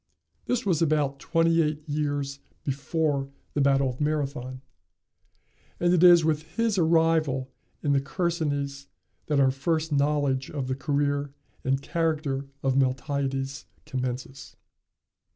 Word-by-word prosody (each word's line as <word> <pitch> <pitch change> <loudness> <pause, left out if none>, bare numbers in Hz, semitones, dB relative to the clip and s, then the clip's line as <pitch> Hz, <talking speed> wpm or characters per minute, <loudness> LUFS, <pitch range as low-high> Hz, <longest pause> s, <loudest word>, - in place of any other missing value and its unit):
This 250 0 -1
was 175 -5 +1
about 145 -3 +1
twenty 165 +2 +2
eight 150 -1 -2
years 145 -2 -2 0.2
before 140 0 -1 0.2
the 145 - +1
battle 135 -1 +3
of 125 +2 -5
Marathon, 140 -4 -2 1.2
and 175 0 +3
it 180 -1 +4
is 175 -2 +8
with 155 -1 +1 0.2
his 225 -4 +2
arrival 160 -5 +2 0.3
in 145 - +2
the 140 - +3
Chersonese 145 -3 -2 0.4
that 150 -2 +2
our 135 -1 +5
first 155 +4 -1
knowledge 140 -2 +1
of 140 -3 -3
the 130 - 0
career 145 0 -1 0.3
and 135 +1 0
character 155 -5 -1 0.2
of 135 -1 +1
Miltiades 135 0 -1 0.2
commences. 130 +1 -5
145 Hz, 125 wpm, -26 LUFS, 135-160 Hz, 1.2 s, is